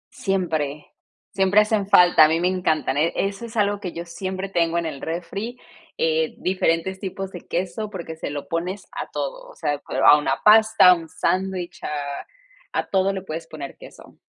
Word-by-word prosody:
Siempre, 160 -7 -2 0.4
siempre 195 +1 +4
hacen 210 -2 0
falta, 175 -5 +7
a - - +5
mí 160 +1 +1
me 180 - +1
encantan. 160 -6 0
E 165 +3 +2
eso 195 +3 -2
es 230 - -9
algo 205 -1 +1
que 185 -4 -6
yo 170 +1 -6
siempre 185 +3 -5
tengo 170 -3 0
en 170 - -1
el 145 -4 -5
refri, 200 +9 -5 0.4
eh, 160 -1 0
diferentes 185 0 0
tipos 190 0 -5
de 180 - -8
queso, 190 +5 -3
porque 170 -5 -7
se 160 - -5
lo 145 -1 -6
pones 180 +4 -3
a - - -6
todo, - - -5
o - - -15
sea, 145 -2 -2 0.2
a 150 - +9
una 135 -2 -1
pasta, 220 -2 +7
a - - +9
un 165 -2 -6
sándwich, 185 0 -2
a 145 -1 -4 0.5
a - - 0
todo 195 0 +2
le 190 - -4
puedes 165 -2 -6
poner 145 -3 -8
queso. - - -15
180 Hz, 190 wpm, -23 LUFS, 160-195 Hz, 0.5 s, a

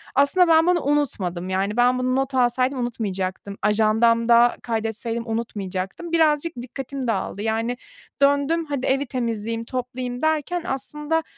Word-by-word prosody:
Aslında 285 +7 +4
ben 325 0 +5
bunu 355 -1 +3
unutmadım, 195 -12 -1
yani, 195 +3 -1
ben 250 +1 +4
bunu 255 0 0
not 270 0 -1
alsaydım 255 +1 +2
unutmayacaktım, 200 -4 -3
ajandamda 230 +3 +4
kaydetseydim 225 +1 -3
unutmayacaktım. 205 - -4
Birazcık 320 0 +2
dikkatim 265 +1 -6
dağıldı. 200 -2 -2
Yani 225 +3 -1 0.4
döndüm 285 +4 +3
hadi 285 -3 -3
evi 275 +2 +1
temizleyeyim, 230 -2 -3
toplayayım 250 0 -4
derken 315 +2 0
aslında 300 +4 -2
245 Hz, 125 wpm, -23 LUFS, 225-280 Hz, 0.4 s, ben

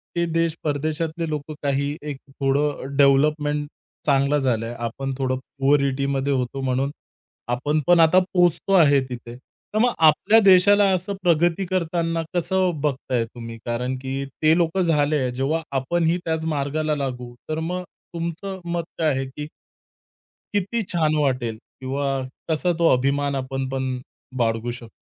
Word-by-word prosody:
ते 170 0 +1
देश, 165 -1 +1
परदेशातले 155 +2 -2
लोक 150 0 -4
काही 140 +1 0
एक 145 -2 -5
थोडं 140 0 -1
डेव्हलपमेंट 145 +1 +3 0.4
चांगलं 140 0 +3
झालंय. 120 -3 -1
आपण 125 +4 -4
थोडं 130 -1 0 0.2
पुअरिटीमध्ये 140 0 +1
होतो 130 +1 -2
म्हणून 135 +1 0 0.6
आपण 145 +5 0
पण 175 -1 +6
आता 165 +3 +6
पोहचतो 175 +1 +2
आहे 145 -6 +6
तिथे. 120 -1 -7 0.4
तर - - 0
मग 245 +1 +3
आपल्या 160 +8 +5
देशाला 200 +2 +6
असं 185 +2 -2
प्रगती 175 +2 +2
करताना 170 -2 -1
कसं 185 +1 +1
बघताय 130 -4 0
तुम्ही? 115 0 -9
कारण 125 +2 -2
की 135 +1 -4 0.2
ते 155 0 +5
लोक 170 +1 +1
झाले. 150 -6 +2
जेव्हा 135 +6 -1 0.2
आपणही 165 +5 +1
त्याच 160 -1 -1
मार्गाला 150 +2 -1
लागू, 125 -4 -4 0.2
तर 155 +1 -1
मग 180 +3 -3 0.3
तुमचं 170 +3 -4
मत 170 - -1 0.2
काय 160 -1 +3
आहे 135 0 -2
की 150 +3 -7 1.1
किती 205 +4 0
छान 160 -5 0
वाटेल 130 -6 0
किंवा 130 +4 -5 0.4
कसा 170 +3 +1
तो 170 - +4
अभिमान 140 +2 +1
आपण 135 0 -3
पण 135 0 -2 0.5
बाळगू 115 0 0
शकतो? 120 -2 -9
145 Hz, 140 wpm, -23 LUFS, 135-165 Hz, 1.1 s, पण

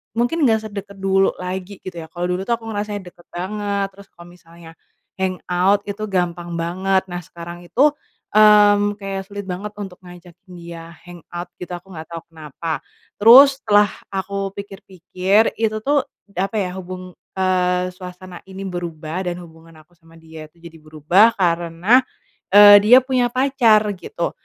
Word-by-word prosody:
mungkin 245 +8 0
nggak 220 -1 +3
sedekat 200 0 -8
dulu 195 0 +2
lagi 185 +2 -6
gitu 180 -3 -7
ya, 160 - -9
kalo 175 +1 -4
dulu 180 +1 -2
tuh 235 - +2
aku 230 - -16
ngerasanya 205 -1 -4
deket 175 - -23
banget, 200 +2 -3
terus 200 +1 -16
kalo 170 - -15
misalnya, 170 -1 -16 0.5
hangout, 185 +1 0
itu 205 +1 -5
gampang 175 -3 -2
banget. 190 +3 0
Nah 175 - -4
sekarang 170 +1 -10
itu, 275 +11 +3 0.4
mmm, 205 -1 +5
kayak 195 -1 -5
sulit 205 0 -7
banget 195 +3 -5
untuk 190 -3 -8
ngajakin 175 +1 -15
dia, 170 0 -10
hangout 175 0 -9
gitu, 180 - -8
aku 185 +2 -13
nggak 160 -2 -9
tau 165 0 -7
kenapa. 160 0 -6 0.4
Terus 265 +5 +8
setelah 205 -3 +4 0.2
aku 195 0 -3
pikir-pikir, 195 +1 -1
itu 220 -1 0
tuh, 280 +5 +1 0.4
apa 195 +4 -2
ya, 190 -4 -1
hubung 185 0 -8 0.2
eee, 180 -1 0
suasana 180 -1 -11
ini 195 +1 -8
berubah, 175 -1 -5
dan 175 - -7
hubungan 165 -1 -15
aku 165 +3 -23
sama 165 -1 -20
dia 160 -1 -12
itu 170 - -28
jadi 170 -1 -13
berubah 155 +9 +3
karena, 175 +7 +2 0.5
eee, 205 0 +10
dia 220 +5 +7
punya 255 -2 +1
pacar, 255 -5 +4 0.2
gitu. 440 - -4
185 Hz, 155 wpm, -20 LUFS, 175-205 Hz, 0.5 s, eee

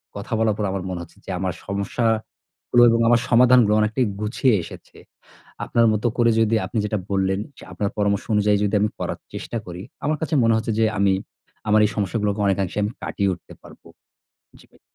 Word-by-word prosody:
কথা - - -6
বলার 110 -2 +2
পর 105 - -1
আমার 95 -1 -3
মনে 90 -1 -4
হচ্ছে 85 - -13
যে - - -11
আমার 95 -1 -2
সমস্যাগুলো 110 +4 -1
এবং 115 0 +2
আমার 120 0 +5
সমাধানগুলো 120 -2 +5
অনেকটাই 110 +4 +1 0.2
গুছিয়ে 115 +4 +1
এসেছে। 80 - -12 0.7
আপনার 115 0 +2
মতো 105 +2 -1
করে 120 -1 +3
যদি 115 0 +2
আপনি 115 - -3
যেটা 105 0 -1
বললেন, 95 -1 0 0.2
যে - - -13
আপনার 100 -1 -2
পরামর্শ 100 -1 0
অনুযায়ী 105 0 +3
যদি 105 - -1
আমি 105 - +2
করার - - -4 0.2
চেষ্টা - - -6
করি, 90 0 -7 0.2
আমার 150 +2 +1
কাছে 160 - -2
মনে 115 0 +3
হচ্ছে 110 0 -2
যে 115 - +3
আমি 100 -1 +3 0.6
আমার 105 0 +5
এই 105 - +1
সমস্যাগুলোকে 105 0 -1
অনেকাংশে 95 -1 -1
আমি 105 +2 -1
কাটিয়ে 100 -1 -1
উঠতে 85 -2 -10
পারব। - - -16 0.8
জি - - -19
ভাই। - - -25
105 Hz, 190 wpm, -22 LUFS, 100-115 Hz, 0.8 s, আমার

